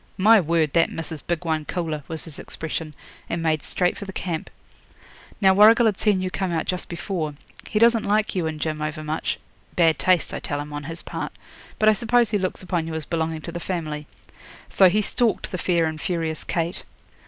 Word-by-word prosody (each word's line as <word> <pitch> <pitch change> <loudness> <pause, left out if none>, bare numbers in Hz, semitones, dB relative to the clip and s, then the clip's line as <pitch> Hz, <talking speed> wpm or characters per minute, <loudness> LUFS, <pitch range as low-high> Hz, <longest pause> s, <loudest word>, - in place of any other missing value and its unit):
"My 220 +3 +7
word, 160 -3 +1
that 165 -1 +3
missis 160 -2 -5
big 175 0 -3
one 160 -1 0
coolah!" 160 -2 -3
was 160 -1 -5
his 160 -4 -7
expression, 160 -1 -5 0.3
and 170 -1 -2
made 155 -2 +1
straight 180 +3 0
for 200 - -6
the 195 - -6
camp. 170 -4 -4 0.9
Now 190 -2 +6
Warrigal 220 +4 +7
had 210 -4 +2
seen 200 -4 +2
you 185 - -2
come 190 -2 -2
out 160 -1 -1
just 180 -1 -3
before. 170 -4 -3 0.3
He - - -1
doesn't 230 0 +5
like 210 +1 +1
you 175 -4 0
and 155 -1 -4
Jim 155 -1 -2
over 155 +1 -3
much 155 +1 -2 0.4
bad 165 -2 +4
taste, 185 -3 +2
I - - -3
tell 145 - -3
him, 145 0 -6
on 145 -1 -5
his 165 +2 -7
part - - -5 0.4
but 215 - +2
I 215 - +8
suppose 235 0 +2
he 205 - +2
looks 185 0 -3
upon 175 -3 -1
you 160 - -4
as 160 -2 -3
belonging 160 -1 -2
to 170 - -6
the 175 - -5
family. 155 -5 -4 0.6
So 190 -2 +6
he 210 +4 +2
stalked 235 +1 0
the 185 - -3
fair 170 -2 +2
and 155 -1 -3
furious 165 -4 -2
Kate.' 170 0 -2
170 Hz, 210 wpm, -24 LUFS, 160-190 Hz, 0.9 s, I